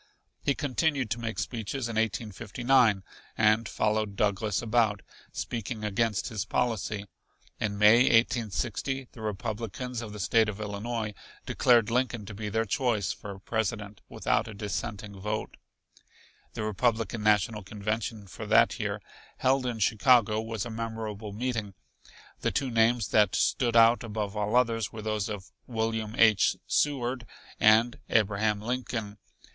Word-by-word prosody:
He 140 - +1
continued 140 -3 0
to 120 - -1
make 115 -1 -4
speeches 120 +2 -3
in 115 - -5
1859 110 +1 +1 0.3
and 110 0 +3
followed 105 -1 0
Douglas 105 0 0
about, 110 -3 +1 0.3
speaking 115 -1 -4
against 105 0 0
his 110 -4 -3
policy. 110 -4 -1 0.5
In 105 -2 -2
May, 105 +2 +7
1860, 120 +3 +1
the 115 - -12
Republicans 115 +3 -4
of 110 -2 -7
the 105 - -8
State 110 +2 +3
of 105 0 -6
Illinois 105 +1 -3 0.3
declared 115 -2 +3
Lincoln 120 -3 0
to 105 - -8
be 105 +1 -5
their 110 +2 0
choice 110 -2 0
for 100 -2 -8
President 105 0 -3
without - - 0
a 110 - -8
dissenting 105 -1 -5
vote. 105 +2 -3 1.0
The 110 - -3
Republican 115 +1 0
National 105 0 +2
Convention 105 +2 -4
for 95 - -8
that - - +4
year, - - -3 0.3
held 130 0 +2
in 120 -2 -2
Chicago, 110 0 +4
was 110 -3 -4
a 120 - -6
memorable 110 -2 -5
meeting. 110 -3 -3 0.6
The - - 0
two 135 -2 -1
names 115 +1 +3
that 105 -3 +3
stood 120 -2 +1
out 115 +1 +6
above 105 -2 -4
all 105 +2 -1
others 115 -4 +2
were 110 -2 -8
those 110 -1 -1
of 100 -3 -7 0.2
William 110 -2 -2
H. 110 -4 +5
Seward 125 -4 0 0.3
and 115 +2 +5
Abraham 105 0 +2
Lincoln. 115 -3 -3
110 Hz, 140 wpm, -28 LUFS, 105-120 Hz, 1.0 s, May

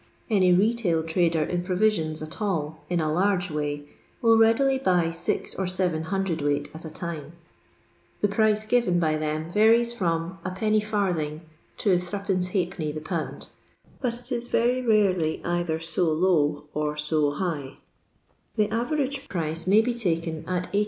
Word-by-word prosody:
Any 185 -4 +4
retail 190 -3 +2
trader 165 -1 +1
in 175 +3 -1
provisions 180 -4 0
at 155 +7 -8
all 160 -6 -2
*• - - -11
in 175 - +2
a 155 -1 0
large 180 0 +1
way," 145 -1 -3 0.3
will 230 -1 +5
readily 230 +5 +4
buy 180 -8 +2
six 165 - -2
or 190 - -2
seven 180 -3 -1
cwt. 160 -6 -1
at 160 - -9
a 160 - -6
time. 155 -2 -6 0.9
The 205 - +4
price 215 +1 +2
given 220 -6 +2
by 155 -2 +1
them 155 +1 -3
varies 230 +4 +4
from 170 -3 -2
Ijc/. 190 -5 0 0.4
to 195 -4 +3
3^(^ 180 -3 -2
the - - -3
pound, 165 0 -4 0.5
but 245 -3 -1
it 245 +2 -12
is 240 -1 -2
very 245 +2 +2
rarely 195 -9 +2
either 175 -2 -1
so 165 +2 -1
low 155 -3 +2
or 150 0 -2
so 150 0 +1
high. 145 -5 -3 0.8
The 210 -2 +2
average 275 +3 -1
price 165 -1 -3
may 205 +3 +6
be 245 +2 -1
taken 165 -8 -1
at 180 +1 -2
18i. 200 - +3
180 Hz, 150 wpm, -26 LUFS, 160-215 Hz, 0.9 s, may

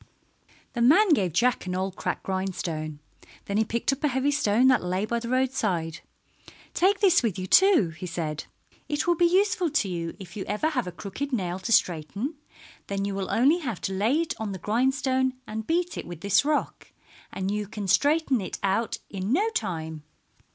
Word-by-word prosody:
The 240 - -2
man 345 - +6
gave 200 - +3
Jack 235 +4 +1
an 180 - -2
old 190 0 -2
cracked - - -3
grindstone. 170 -5 -3 0.4
Then 200 - -2
he 220 - +4
picked 235 +5 -1
up 275 - -8
a - - +4
heavy 265 +1 +1
stone 255 -4 +3
that 255 -6 +3
lay 185 +3 -1
by 235 +2 -1
the 235 0 -6
roadside. 220 -11 0 0.7
"Take 385 +2 +2
this 370 -4 +5
with 225 -7 -1
you, 185 - -3
too," 370 - +5
he 165 +3 -8
said. 160 -3 -4 0.4
"It 295 -1 -1
will 350 - +4
be 345 +1 +3
useful 370 -1 +2
to 220 - +1
you 170 -2 -4
if 190 +1 -11
you 200 - -4
ever 210 +10 0
have 250 - -2
a - - -4
crooked 205 +11 -6
nail 185 -6 -2
to 210 +5 -4
straighten. 200 - +1 0.5
Then 200 0 -2
you 200 - -2
will 195 -1 -3
only 285 +9 +4
have 240 - -4
to 195 - -2
lay 220 +10 +2
it 335 - -2
on 215 -3 -3
the - - -5
grindstone 260 - +1
and 220 0 -6
beat 350 +1 0
it - - -7
with 170 -2 -8
this 200 +3 +3
rock, 300 +1 -2 0.4
and 190 +1 -3
you 210 0 -2
can 205 0 -5
straighten 280 - +3
it 185 - -5
out 200 +4 0
in 195 +1 -4
no 405 - +2
time." 160 - -3
215 Hz, 200 wpm, -26 LUFS, 185-280 Hz, 0.7 s, man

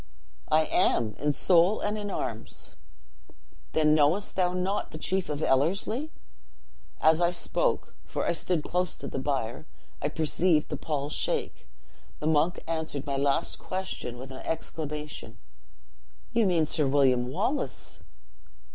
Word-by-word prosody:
'I 155 +1 +5
am, 115 - +2
in 150 0 +2
soul 175 +6 +4
and 210 +1 -1
in 205 -1 -4
arms.' 115 - -5 1.0
'Then 155 -1 +4
knowest 155 +7 +2
thou 180 -2 +2
not 185 +3 -1
the - - -8
chief 185 +3 0
of 150 +1 -2
Ellerslie?' 195 - +1 0.9
As 160 +2 +4
I 170 - +4
spoke, 470 - -1
for - - -3
I - - +2
stood 175 -5 +1
close 180 -1 0
to - - -7
the - - -3
bier, 130 0 -2 0.3
I 145 - +1
perceived 160 +1 +2
the - - -2
pall 145 -2 -3
shake. - - -1 0.5
The - - -5
monk 160 +3 +2
answered 160 -4 -3
my 140 - -1
last 140 0 +1
question 185 -10 -4
with 130 +2 -9
an 130 - -7
exclamation 150 -7 -4 1.0
'You 230 -3 +3
mean 170 -4 +3
Sir 150 -1 +2
William 130 -3 +3
Wallace!' 130 - -2
155 Hz, 140 wpm, -28 LUFS, 140-180 Hz, 1.0 s, I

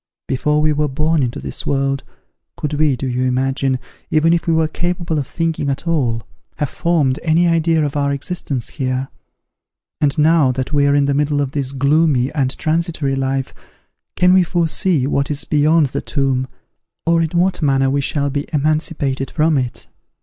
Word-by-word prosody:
Before 150 +3 +1
we 155 -1 +3
were 150 0 0
born 155 +3 +1
into 120 -2 -2
this - - -6
world, 135 0 -1 0.5
could 150 0 -3
we, 150 -2 +2
do 135 - -5
you 125 0 -1
imagine, 130 +1 0 0.3
even 160 +2 +3
if 170 - -1
we 165 - +3
were 160 -1 +2
capable 170 -1 -2
of 140 - -4
thinking 165 -4 -2
at 140 +5 -3
all, 125 -9 0 0.3
have 150 -3 -2
formed 155 -6 +1
any 170 +2 +3
idea 165 -2 +2
of 145 - -4
our 140 -1 +1
existence 140 -3 -4
here? 130 -1 -2 0.9
And 145 +1 +1
now 155 -3 +4
that 130 +3 -4
we 140 -1 +3
are 140 - +3
in 145 -1 +3
the 140 - +1
middle 145 +1 +1
of 140 -2 -1
this 135 -2 -2
gloomy 140 -1 +2
and 135 -4 -1
transitory 160 -3 -1
life, 135 0 -2 0.6
can 180 0 +4
we 185 - +6
foresee 170 -3 +1
what 140 0 0
is 145 -1 -2
beyond 155 +1 +3
the - - -3
tomb, 135 -3 -1 0.6
or 165 0 +3
in 160 - 0
what 180 +1 +1
manner 135 -2 +2
we 140 +1 +1
shall 140 0 -1
be 145 +1 -3
emancipated 150 -3 -1
from 155 0 +1
it? 125 -3 -2
145 Hz, 180 wpm, -18 LUFS, 135-160 Hz, 0.9 s, we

